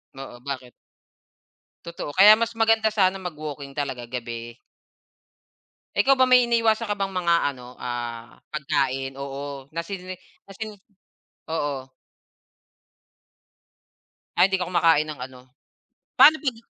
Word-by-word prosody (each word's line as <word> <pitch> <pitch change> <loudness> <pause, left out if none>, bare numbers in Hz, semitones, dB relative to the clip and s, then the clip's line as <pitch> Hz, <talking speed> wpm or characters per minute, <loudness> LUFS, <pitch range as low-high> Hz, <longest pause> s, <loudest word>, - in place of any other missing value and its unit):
Oo, 135 -2 -9
bakit? 130 -3 -6 1.2
Totoo, 170 -3 -6
kaya 210 +3 +9
mas 230 0 0
maganda 225 -1 +2
sana 190 -2 +2
mag-walking 150 -6 -7
talaga, 135 -4 -4
gabi. 120 0 -7 1.3
Ikaw 275 0 +4
ba 260 - +4
may 255 -1 +5
iniiwasan 230 -1 +2
ka 205 - -1
bang 195 -1 -2
mga 175 -2 +2 0.2
ano, 125 -1 -13
ah, 120 -1 -6
pagkain 135 -2 -1
oo 140 0 -6
nasini 185 +2 -5 0.3
nasi 215 +2 -7 0.8
oo. 145 -4 -3 2.5
Ay, - - +6
hindi 190 0 0
ka 180 - -2
kumakain 165 -4 +3
ng 150 - -10
ano, 130 -1 -15 0.8
paano 315 +1 +9
'pag 265 -6 -2
155 Hz, 115 wpm, -24 LUFS, 135-205 Hz, 2.5 s, kaya